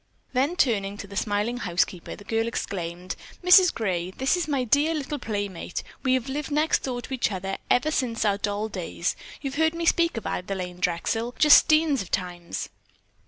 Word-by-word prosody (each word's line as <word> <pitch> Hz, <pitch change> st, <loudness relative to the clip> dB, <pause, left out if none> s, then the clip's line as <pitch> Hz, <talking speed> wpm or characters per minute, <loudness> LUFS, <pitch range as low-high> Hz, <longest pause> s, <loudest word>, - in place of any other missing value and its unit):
Then 275 Hz, +7 st, +1 dB
turning 205 Hz, -, +1 dB
to 200 Hz, -, -7 dB
the 200 Hz, 0 st, -11 dB
smiling 210 Hz, +4 st, 0 dB
housekeeper, 180 Hz, -4 st, -1 dB
the -, -, -13 dB
girl 225 Hz, +2 st, 0 dB
exclaimed: 180 Hz, -5 st, -4 dB, 0.3 s
"Mrs. 360 Hz, 0 st, +7 dB
Gray, 185 Hz, -5 st, -2 dB
this 265 Hz, -, +1 dB
is 350 Hz, -2 st, -2 dB
my 280 Hz, -4 st, 0 dB
dear 290 Hz, +7 st, +2 dB
little 295 Hz, 0 st, -3 dB
playmate. 205 Hz, -6 st, -4 dB, 0.2 s
We 260 Hz, -1 st, +3 dB
have 255 Hz, -1 st, -2 dB
lived 285 Hz, +2 st, -3 dB
next 305 Hz, +2 st, +2 dB
door 245 Hz, -2 st, -4 dB
to -, -, -7 dB
each 250 Hz, -4 st, 0 dB
other 195 Hz, 0 st, -4 dB
ever 280 Hz, +5 st, +3 dB
since 235 Hz, -6 st, 0 dB
our 200 Hz, -1 st, +2 dB
doll 205 Hz, +1 st, -1 dB
days. 180 Hz, -3 st, -3 dB, 0.3 s
You've 275 Hz, -1 st, -4 dB
heard 320 Hz, +1 st, +3 dB
me 335 Hz, 0 st, -2 dB
speak 335 Hz, -4 st, +3 dB
of 225 Hz, -, -5 dB
Adelaine 180 Hz, -1 st, -4 dB
Drexel 225 Hz, +8 st, -1 dB
just 300 Hz, -1 st, +7 dB
steens 310 Hz, -3 st, +3 dB
of 185 Hz, -, -8 dB
times." 175 Hz, -2 st, -3 dB
225 Hz, 185 wpm, -26 LUFS, 195-285 Hz, 0.3 s, Mrs